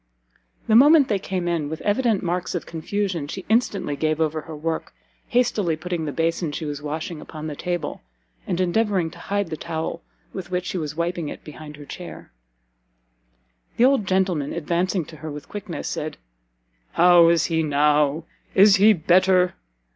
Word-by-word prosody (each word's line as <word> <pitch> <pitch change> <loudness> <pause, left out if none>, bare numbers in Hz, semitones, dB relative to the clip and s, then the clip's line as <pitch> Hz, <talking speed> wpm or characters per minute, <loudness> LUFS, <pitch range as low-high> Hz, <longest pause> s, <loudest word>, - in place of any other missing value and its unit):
The 220 - +3
moment 290 +3 +7
they 205 -3 +1
came 185 -2 -3
in, 165 -4 -1
with 160 +1 -5
evident 215 -1 +1
marks 180 +1 -2
of 175 - -3
confusion, 170 -1 -3
she 190 +5 -7
instantly 210 -9 +1
gave 155 +1 0
over 155 -1 0
her 160 0 -9
work, 160 +2 -4 0.3
hastily 215 -9 +1
putting 170 0 -4
the 150 - -2
basin 165 +1 -1
she 155 +2 -5
was 145 -1 -4
washing 155 +2 -5
upon 155 -1 -8
the 150 -2 -4
table, 175 +2 -3 0.5
and 180 -2 -1
endeavouring 185 -2 +1
to - - -13
hide 200 -4 -2
the 155 - -3
towel 160 +1 -4 0.3
with - - -6
which 180 0 -2
she 185 - -3
was 150 -2 -4
wiping 170 -1 -2
it - - -9
behind 150 0 -10
her 145 0 -11
chair. - - -9 1.5
The 240 - +5
old 265 -7 +3
gentleman, 185 -6 0
advancing 170 +2 -1
to 155 - -12
her 155 +1 -7
with 145 0 -8
quickness, 195 -4 -6
said, 155 +1 -4 0.8
"How 175 -1 +6
is 170 -2 +3
he 160 -1 0
now? 150 0 +2 0.3
Is 200 +1 +7
he 210 +3 +6
better? 180 +1 +3
170 Hz, 170 wpm, -23 LUFS, 155-190 Hz, 1.5 s, moment